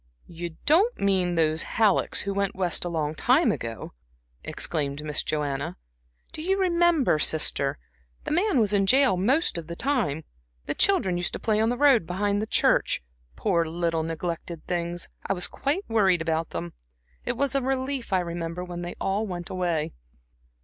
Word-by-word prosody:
"You 170 -1 -7
don't 380 +11 +3
mean 185 -3 +1
those 160 -1 +2 0.2
Hallecks 215 -3 +3
who 200 - -2
went 200 -1 -1
West 180 -2 +1
a 175 - -3
long 155 -3 -2
time 255 - +3
ago?" 115 -1 -6 0.5
exclaimed 145 -2 -2
Miss 150 -1 0
Joanna. 140 - -2 0.5
"Do - - -6
you 385 +4 0
remember, 340 - +3
sister? 145 -3 +1 0.5
the - - -4
man 355 - +2
was 210 -2 +2
in 195 -1 +2
jail 265 -2 +5
the 180 - -3
most 260 - +2
of 160 - -10
the 170 - -6
time. 215 - -1 0.4
The - - -1
children 195 - +3
used 175 - -1
to - - -3
play 215 -1 +1
on 220 +1 +2
the 245 - -1
road 260 - +4
behind 205 +3 0
the 220 - -3
church - - +2 0.3
poor 175 -5 +1
little 165 0 -1
neglected 165 0 -5
things, 175 -1 -2 0.2
I - - +1
was 180 -2 -1
quite 300 +9 -2
worried 190 -7 +2
about 160 0 -1
them. 85 0 -5 0.5
It 245 - -2
was 280 0 +1
a 275 - +2
relief, 260 -1 -2
I 185 -1 +3
remember, 170 0 -4
when 175 -1 -6
they 175 0 -6
all 200 +3 -1
went 175 -2 -6
away." 175 -4 -1
180 Hz, 175 wpm, -26 LUFS, 165-245 Hz, 0.5 s, jail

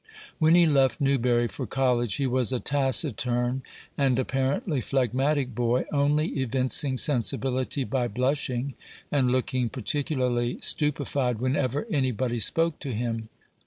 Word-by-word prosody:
When 160 +1 +5
he 175 -1 +6
left 135 -3 +2
Newbury 125 -4 +2
for 95 - -6
college, 125 -4 0
he 140 - -1
was 130 -1 +1
a 130 - 0
taciturn 130 -2 0 0.3
and 135 -3 +1
apparently 135 +3 -1
phlegmatic 135 +2 0
boy, 120 +2 0
only 150 +2 +1
evincing 130 +1 +2
sensibility 130 - 0
by 125 -1 -1
blushing 130 +2 -2 0.4
and 130 -4 +2
looking 130 -1 0
particularly 125 -2 -1
stupefied 140 -4 0
whenever 130 - -1
any 135 -5 +1
body 120 0 -2
spoke 165 +7 +2
to 135 -6 -5
him. 115 -1 -3
130 Hz, 125 wpm, -26 LUFS, 125-140 Hz, 0.4 s, he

